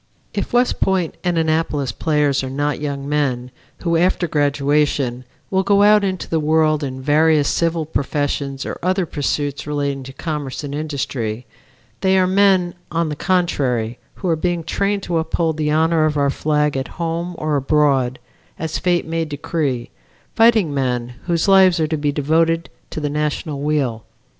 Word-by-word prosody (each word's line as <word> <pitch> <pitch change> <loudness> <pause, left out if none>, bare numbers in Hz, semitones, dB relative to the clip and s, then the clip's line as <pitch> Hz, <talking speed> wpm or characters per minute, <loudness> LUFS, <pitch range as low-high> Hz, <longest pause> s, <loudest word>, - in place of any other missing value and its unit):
If - - -3
West 245 +1 +2
Point 185 -4 +1
and 175 -1 0
Annapolis 155 -5 0
players 145 +1 +1
are 130 - -4
not 145 +1 -2
young 140 -2 -3
men, 130 -4 -1 0.3
who, 170 -1 +1
after 175 0 +2
graduation, 145 -3 +1 0.3
will 190 0 +3
go 200 +1 +3
out 210 0 +6
into 190 -2 -2
the 165 - 0
world 155 0 +2
in 130 -1 -5
various 150 +1 +3
civil 165 -1 0
professions 140 -2 -2
or - - -5
other 185 +1 +1
pursuits 145 -2 -2
relating 140 -2 -2
to 135 - -8
commerce 150 -1 -4
and 140 -1 -5
industry, 130 -6 -3 0.5
they 190 0 +3
are 185 - +4
men, 190 -2 +3 0.2
on 165 -1 -1
the 150 - -3
contrary, 135 -10 0 0.2
who 190 - -5
are 165 - +3
being 175 +1 -1
trained 200 +4 -1
to 170 -2 0
uphold 160 0 -1
the 150 -1 0
honor 160 +1 +3
of 150 -1 0
our 140 -1 +2
flag 150 0 0
at 135 0 -2
home 170 +1 -3
or 155 -1 -1
abroad, 135 -3 +2 0.4
as 160 -1 -3
fate 175 -1 +1
may 165 0 -1
decree 145 -4 -3 0.4
fighting 225 -9 +4
men 125 -3 -1
whose 170 0 +1
lives 190 -3 +6
are 160 - +2
to 160 - -1
be 145 0 0
devoted 165 +3 +1 0.2
to - - -5
the 150 - -1
National 150 -1 -2
weal. 140 -7 -1
150 Hz, 165 wpm, -20 LUFS, 140-170 Hz, 0.5 s, out